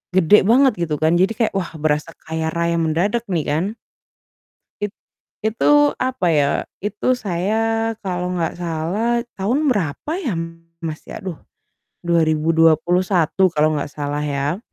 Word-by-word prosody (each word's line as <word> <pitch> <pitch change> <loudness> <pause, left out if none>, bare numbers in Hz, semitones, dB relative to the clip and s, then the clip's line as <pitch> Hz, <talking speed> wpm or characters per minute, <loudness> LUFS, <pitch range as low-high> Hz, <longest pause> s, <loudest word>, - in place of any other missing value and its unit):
gede 190 +3 +6
banget 260 +3 +5
gitu 150 - -1
kan, 155 +2 +2
jadi 190 +5 +3
kayak, 225 -2 0
wah, 180 -3 -3
berasa 155 +1 -1
kaya 160 0 -2
raya 170 0 0
mendadak 180 +9 0
nih 170 -5 0
kan. 155 +5 0 1.2
It 205 0 -2 0.5
itu 290 +7 +4
apa 255 -7 0
ya, 145 -2 +3 0.3
itu 210 +5 0
saya 225 +4 0
kalau 180 -2 -2
enggak 170 -3 -2
salah 175 +8 -1 0.2
tahun 250 +10 0
berapa 200 - -2
ya 280 - -2 0.5
Mas, 160 -2 -5
ya - - -8
aduh, 190 -5 -5 0.7
2021 165 +2 +3
kalau 155 +1 +3
enggak 145 - -4
salah 145 0 -3
ya, 145 +3 -1
175 Hz, 135 wpm, -20 LUFS, 160-215 Hz, 1.2 s, gede